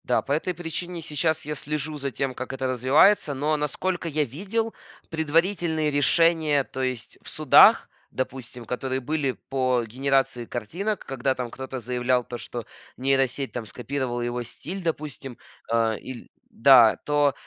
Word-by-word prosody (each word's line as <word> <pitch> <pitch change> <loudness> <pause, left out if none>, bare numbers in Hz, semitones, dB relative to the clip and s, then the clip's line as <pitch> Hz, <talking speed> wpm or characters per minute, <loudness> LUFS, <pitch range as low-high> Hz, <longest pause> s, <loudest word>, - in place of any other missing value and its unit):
Да, 125 - +2
по - - -7
этой 160 +5 0
причине 175 0 -5
сейчас 155 0 -1
я 150 - -3
слежу 150 0 -3
за 140 -1 -2
тем, 135 +2 -2
как 130 +1 -6
это 135 0 -2
развивается. 140 - +4
Но, 150 +3 0
насколько 170 +4 -2
я 155 -1 +1
видел, 200 - -2 0.4
предварительные 160 0 +1
решения, 155 0 +4
то 130 - -7
есть 130 -3 -3
в - - -10
судах, - - +6 0.2
допустим, 125 -2 -5
которые 130 +2 -2
были 140 0 -1 0.2
по 130 -2 +1
генерации 135 +1 0
картинок, 180 - -4
когда 135 0 -1
там 125 -2 -5
кто-то 130 0 -6
заявлял 125 +1 0
то, 120 - -7
что 120 -1 -6 0.3
нейросеть 135 -1 +1
там 115 +1 -5
скопировала 125 +2 -4
его 120 0 -2
стиль, 175 +10 -7
допустим. 145 -6 -4 0.3
Э, 115 -2 +2
или 130 -2 -9 0.2
да, 120 -3 +6
то 145 -1 +2
135 Hz, 150 wpm, -25 LUFS, 125-155 Hz, 0.4 s, судах